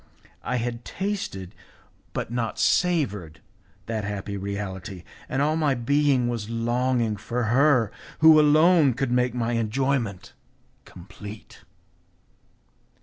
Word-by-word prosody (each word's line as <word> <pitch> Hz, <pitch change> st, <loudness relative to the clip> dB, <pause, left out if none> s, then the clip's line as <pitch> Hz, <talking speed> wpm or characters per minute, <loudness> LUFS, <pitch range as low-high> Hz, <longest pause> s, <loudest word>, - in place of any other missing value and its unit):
I 125 Hz, -, -2 dB
had 120 Hz, -1 st, -3 dB
tasted, 185 Hz, -, -4 dB, 0.6 s
but -, -, -4 dB
not 120 Hz, -2 st, -2 dB
savoured, 105 Hz, -, +1 dB, 0.5 s
that 110 Hz, -2 st, -3 dB
happy 100 Hz, 0 st, -4 dB
reality, 95 Hz, -2 st, -5 dB, 0.3 s
and 135 Hz, +2 st, 0 dB
all 155 Hz, +2 st, +1 dB
my 150 Hz, -4 st, +1 dB
being 135 Hz, 0 st, +2 dB
was 115 Hz, -3 st, -3 dB
longing 120 Hz, -1 st, 0 dB
for 120 Hz, +4 st, -3 dB
her 130 Hz, -5 st, +4 dB, 0.3 s
who 160 Hz, -1 st, +7 dB
alone 155 Hz, -2 st, +5 dB
could 135 Hz, -1 st, -1 dB
make 125 Hz, -1 st, +1 dB
my 120 Hz, -1 st, -1 dB
enjoyment 115 Hz, -2 st, -1 dB, 0.5 s
complete. 100 Hz, +3 st, -11 dB
120 Hz, 110 wpm, -25 LUFS, 105-140 Hz, 0.6 s, who